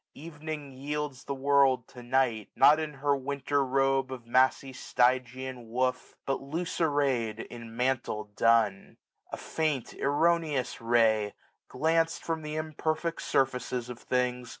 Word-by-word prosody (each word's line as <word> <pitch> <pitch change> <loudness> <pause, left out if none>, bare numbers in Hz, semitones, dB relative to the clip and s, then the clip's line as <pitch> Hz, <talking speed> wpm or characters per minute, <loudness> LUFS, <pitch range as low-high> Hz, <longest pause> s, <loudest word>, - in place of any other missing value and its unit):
Evening 155 -2 -7
yields 140 0 -4
The 140 - -3
world 135 -2 +3
to 125 - -11
Night; 120 -4 0
not 150 +2 +6
in 155 -2 -4
her 140 +1 +1
winter 140 +1 -1
robe 135 0 +1
Of 125 -3 -7
massy 130 +2 +2
Stygian 125 -1 0
woof, 125 +2 -1
but 135 - -1
loose 165 +6 -4
array'd 135 -8 +1
1685 120 +1 -8
In 115 0 -10
mantle 125 -4 0
dun. 115 -4 +2 0.3
A - - -4
faint 155 -6 -2
erroneous 150 -3 +1
ray, 110 -3 +2 0.3
GlancM 165 +1 +1
from 165 -1 -3
th* 155 0 -5
imperfect 155 +1 -2
surfaces 125 -2 0
of 120 - -9
things. 125 -1 -1
135 Hz, 135 wpm, -29 LUFS, 125-150 Hz, 0.3 s, not